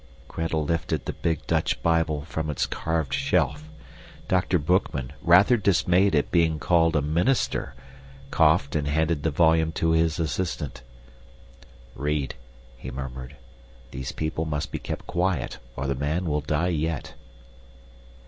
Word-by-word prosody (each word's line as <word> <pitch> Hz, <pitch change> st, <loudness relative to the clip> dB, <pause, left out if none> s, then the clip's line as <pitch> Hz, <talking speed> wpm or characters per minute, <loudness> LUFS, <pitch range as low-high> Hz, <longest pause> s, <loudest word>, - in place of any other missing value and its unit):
Gretel 80 Hz, -1 st, -2 dB
lifted 80 Hz, -3 st, -1 dB
the -, -, -3 dB
big 80 Hz, -3 st, -2 dB
Dutch -, -, 0 dB
Bible 80 Hz, -3 st, +1 dB
from 80 Hz, 0 st, -4 dB
its 75 Hz, -, 0 dB
carved 80 Hz, -4 st, -2 dB
shelf. 75 Hz, +3 st, 0 dB, 0.6 s
Dr. 90 Hz, 0 st, +2 dB
Boekman, 75 Hz, -6 st, 0 dB
rather 95 Hz, +8 st, +6 dB
dismayed 95 Hz, -2 st, +3 dB
at 75 Hz, -, +1 dB
being 80 Hz, -2 st, +3 dB
called 85 Hz, +1 st, +2 dB
a 75 Hz, -, +2 dB
minister, 85 Hz, -, 0 dB, 0.6 s
coughed 70 Hz, -, +3 dB
and 75 Hz, -2 st, 0 dB
handed 80 Hz, +1 st, +1 dB
the 80 Hz, -, +1 dB
volume 80 Hz, +1 st, +3 dB
to 80 Hz, +1 st, +1 dB
his 80 Hz, 0 st, +2 dB
assistant. 85 Hz, -4 st, -3 dB, 1.1 s
"Read," 75 Hz, -1 st, -2 dB, 0.4 s
he 60 Hz, -, -7 dB
murmured. 65 Hz, +1 st, -7 dB, 0.6 s
"These 65 Hz, 0 st, -5 dB
people 80 Hz, +1 st, -3 dB
must 75 Hz, -1 st, -3 dB
be -, -, -3 dB
kept -, -, -6 dB
quiet 90 Hz, -6 st, -1 dB, 0.2 s
or 65 Hz, -, -3 dB
the 70 Hz, -, 0 dB
man 75 Hz, +7 st, -1 dB
will 75 Hz, -2 st, 0 dB
die 75 Hz, +4 st, 0 dB
yet." 80 Hz, -3 st, -2 dB
80 Hz, 140 wpm, -25 LUFS, 75-85 Hz, 1.1 s, rather